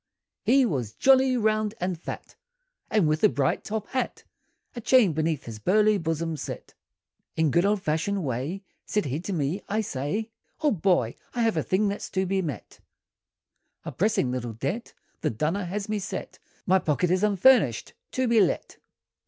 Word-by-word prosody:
] - - -64
he 270 0 +6
WAS 125 - -2
jolly, 265 -1 +4
round, 215 -1 +1
and 180 -2 -2
fat, - - -7 0.5
And 210 -7 +3
with 155 +4 0
a 215 - +7
bright 140 -6 0
top 215 0 -3
hat, 260 -1 -3 0.5
A 240 - -5
chain 230 -6 +4
beneath 155 -2 -1
his 110 -2 -8
burly 210 - +3
bosom 165 -1 -2
set, - - -7 0.6
In 160 -2 +2
good 170 +6 +3
old 205 -2 0
fashioned 165 +6 0
way, 140 - -3 0.2
Said 210 - -1
he 140 +2 -2
to 185 - -5
me, 160 +2 -1
"I 215 +2 +1
say 205 - -3 0.3
Old 280 - +1
boy, 155 - +2 0.2
I 240 - +1
have 225 -4 +2
a 160 - +1
thing 195 +7 +1
that's 200 +1 -4
to 190 0 0
be 190 +1 0
met, 145 - -6 1.1
A - - -4
pressing 195 - +1
little 120 -2 -3
debt, 140 - -4 0.2
The - - 0
dunner 160 - -1
has 200 +3 -4
me 215 -1 -1
set, 190 -1 -6 0.3
My 190 +1 +4
pocket 165 +2 0
is 185 0 +2
unfurnished, 205 - +3 0.2
to 260 -1 +1
be 230 -2 +5
let! 185 - -1
190 Hz, 175 wpm, -26 LUFS, 155-215 Hz, 1.1 s, a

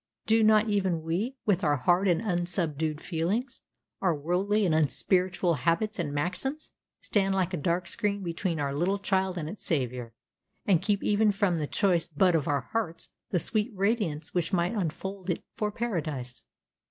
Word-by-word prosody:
Do 225 +1 +4
not 215 0 +5
even 190 -6 0
we, 190 +11 -2
with 195 -4 +2
our 150 -2 +3
hard 175 +8 +2
and 175 +3 +2
unsubdued 170 -5 -1
feelings, 195 +10 -2 0.4
our 180 -4 +2
worldly 190 +8 +1
and 170 - +2
unspiritual 180 +3 +2
habits 170 - 0
and 155 -4 -1
maxims, 225 - -2 0.3
stand 195 -2 +1
like 185 -1 0
a - - 0
dark 170 +3 -1
screen 205 +1 -2
between 170 -1 -2
our 140 -1 -1
little 175 +7 +1
child 190 -2 0
and 155 -3 -3
its 200 +6 -7
Savior, 125 -6 -2 0.5
and 185 -5 +3
keep 205 -1 0
even 210 0 +3
from 195 -3 +1
the 150 -2 -2
choice 180 -3 +2
bud 175 +3 +2
of 155 -3 +1
our 145 -2 +1
hearts 170 - -4 0.2
the 185 - +1
sweet 215 +5 +3
radiance 195 -6 -1
which 175 -1 0
might 175 0 +1
unfold 190 0 -4
it 175 - -1
for 210 -2 -1
Paradise? 155 - -4
180 Hz, 170 wpm, -28 LUFS, 160-205 Hz, 0.5 s, not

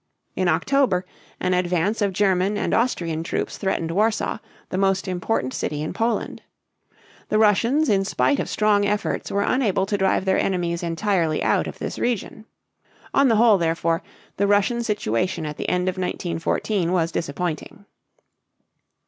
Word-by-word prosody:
In 185 - 0
October 185 - +2 0.3
an 185 0 0
advance 180 +4 0
of 200 -1 +2
German 195 +1 +1
and - - -1
Austrian 170 -10 0
troops 165 - -3
threatened 180 -4 -1
Warsaw, 215 +5 0 0.3
the - - -3
most 195 0 +1
important 180 - -1
city 150 0 -3
in 155 - -4
Poland. 230 +1 -2 0.9
The 215 - +2
Russians 230 +8 +3
in 195 -4 +3
spite 270 +8 +1
of - - -2
strong 210 -1 +2
efforts 205 0 -1
were 200 - 0
unable 210 -7 +1
to 205 0 -2
drive 190 0 +1
their 190 0 +2
enemies 175 -3 -1
entirely 170 -2 0
out - - +2
of - - -7
this - - -5
region. 220 -2 -2 0.7
On 275 0 +4
the 230 - +3
whole, 220 -2 +5
therefore, 165 +1 0 0.4
the 200 - +2
Russian 205 +4 +2
situation 185 - -1
at 150 -1 -5
the - - -3
end 180 0 0
of 185 0 -1
1914 175 +1 -1
was 165 -2 +1
disappointing. 165 +4 -4
190 Hz, 155 wpm, -23 LUFS, 170-210 Hz, 0.9 s, whole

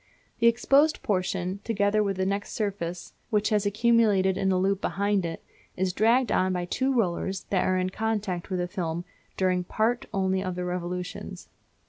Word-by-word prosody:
The 235 - +5
exposed 275 +6 +3
portion, 185 -1 -1
together 210 -1 +1
with 200 -2 -1
the 190 - 0
next 200 +1 -2
surface, 185 -5 -3 0.2
which 210 -2 +1
has 210 -2 +1
accumulated 210 -3 +3
in 190 0 +1
a 185 - +2
loop 195 +1 +1
behind 200 -2 0
it, 165 - -7 0.3
is 185 0 0
dragged 235 +5 +3
on 185 0 +2
by 180 -1 -2
two 260 +9 0
rollers 190 -5 0
that 190 -2 +2
are 185 - +2
in 185 0 -1
contact 210 -5 -2
with 185 - -1
the 180 0 -1
film 175 -3 -3 0.3
during 185 -1 +1
part 230 +7 0
only 190 -2 0
of 185 -2 -3
their 180 0 -3
revolutions. 180 0 -5
195 Hz, 175 wpm, -27 LUFS, 180-215 Hz, 0.3 s, The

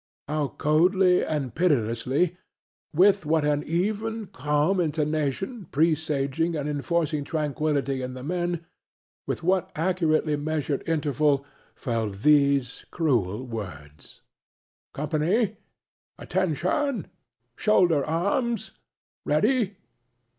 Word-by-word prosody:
How 150 0 0
coldly 180 +4 +3
and 145 -6 -2
pitilessly 140 +1 +1 0.6
with 190 +4 +4
what 155 0 +1
an 145 0 +2
even, 215 +7 -1
calm 150 +4 0
intonation, 155 - -1
presaging, 155 +1 0
and 145 -1 -2
enforcing 150 +1 -1
tranquillity 145 -3 -1
in 130 0 -5
the 130 - -8
men 175 +1 -2 0.6
with - - -3
what 185 +1 +1
accurately 160 -3 +1
measured 150 -1 -2
intervals 150 -2 +2 0.3
fell 115 -5 -2
those 140 +4 +2
cruel 125 - 0
words: 75 - -9 0.7
"Attention, 165 - 0 1.2
company!... 280 - 0 0.5
Shoulder 175 -8 +3
arms!... 200 - -1 0.5
Ready!... 210 - +1
155 Hz, 90 wpm, -26 LUFS, 140-180 Hz, 1.2 s, with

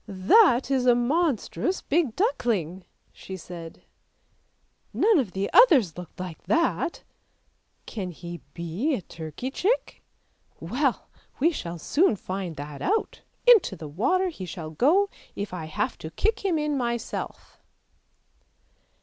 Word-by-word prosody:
" - - -41
That 245 - +4
is 255 -2 +2
a 245 - +6
monstrous 305 - 0
big 290 -6 +1
duckling," 205 - -1 0.3
she 190 - -8
said; 170 -2 -10 0.6
" - - -44 0.3
none 430 -5 +4
of 225 -9 -2
the 195 +1 -1
others 275 - +6
looked 180 -1 -10
like 180 -3 -6
that; 335 +1 0 0.8
can 195 -5 -5
he 175 0 -8
be 180 - -1
a 195 - -6
turkey 165 - -6
chick? 425 - -1 0.6
well - - -1 0.3
we 325 +6 +4
shall 170 - -5
soon 290 - +2
find 185 -3 -5
that 145 0 -8
out; 430 +4 -1 0.2
into 455 - +6
the 160 -3 -8
water 365 - +1
he 255 - -8
shall 160 -3 -6
go, 320 - +3 0.3
if 200 -2 -5
I 170 -3 -4
have 155 - -3
to 160 - -6
kick 440 - -1
him 370 -5 +1
in 300 -2 0
myself." 235 -1 -4
230 Hz, 140 wpm, -26 LUFS, -, 0.8 s, a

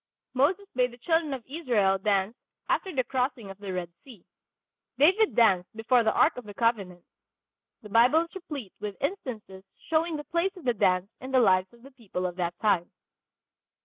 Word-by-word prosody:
Moses 310 +10 +2
bade 250 0 +2
the - - -13
children 325 +3 0
of 260 -4 -5
Israel 235 - +1
dance 200 +2 0 0.3
after 380 - 0
the 265 -6 0
crossing 250 -4 -2
of 195 - -13
the 200 -2 -6
Red 180 -2 -4
Sea. 235 -10 -15 0.7
David 380 +9 +4
danced 190 -6 +3
before 235 +2 +2
the 220 - +2
Ark - - +3
of 250 - -7
the 205 -1 -10
Covenant. 195 -7 -1 0.8
The 210 - -10
Bible 245 +9 +5
is 335 0 -7
replete 295 - -7
with 205 -2 -6
instances 230 - -5 0.3
showing 325 +1 +1
the 295 - -6
place 345 +5 -1
of 360 - -11
the 245 - +2
dance 185 -1 +1
in 260 - -8
the 265 -1 +3
lives 190 -5 +3
of 235 0 -21
the 275 - -14
people 210 -8 -5
of 180 -1 -3
that 175 -1 -2
time. 190 -6 +1
235 Hz, 185 wpm, -27 LUFS, 195-280 Hz, 0.8 s, Bible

